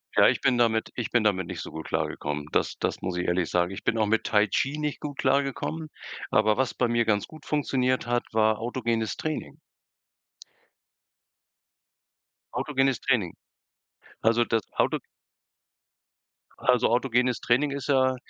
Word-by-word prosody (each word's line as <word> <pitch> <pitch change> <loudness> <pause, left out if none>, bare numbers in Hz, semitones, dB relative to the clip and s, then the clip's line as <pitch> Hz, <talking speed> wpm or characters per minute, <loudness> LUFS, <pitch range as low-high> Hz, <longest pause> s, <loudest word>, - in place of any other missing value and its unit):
Ja, - - +7
ich - - +2
bin 125 -1 +2
damit 110 -2 +2
ich 120 - -3
bin 120 -3 +2
damit 95 -4 +1
nicht - - -5
so - - -7
gut 80 0 -7
klargekommen. 75 0 -2
Das - - 0
das - - -2
muss 90 -1 -3
ich 90 - -1
ehrlich 90 -1 +1
sagen. 90 +1 +1
Ich 95 - -7
bin 115 - +1
auch 110 - +3
mit 110 +1 +1
Tai 105 -1 +4
Chi 140 +6 0
nicht 150 -1 -3
gut 145 -2 -6
klargekommen, 140 +4 0 0.4
aber 110 -1 +3
was 130 +1 -1
bei 125 - +1
mir 120 0 +1
ganz 105 -2 +1
gut 155 -1 -14
funktioniert 130 -4 0
hat, 120 0 0
war 110 -1 +2
autogenes 115 -3 -2
Training. 155 -1 -4 2.9
Autogenes 135 -3 0
Training. 110 -10 +1 0.9
Also, 115 +1 +4
das 115 -2 +1
Auto - - +1 1.6
also 125 -2 +3
autogenes 125 0 +1
Training 140 +5 +2
ist 140 0 -5
ja 130 -2 +3
120 Hz, 155 wpm, -26 LUFS, 110-135 Hz, 2.9 s, Ja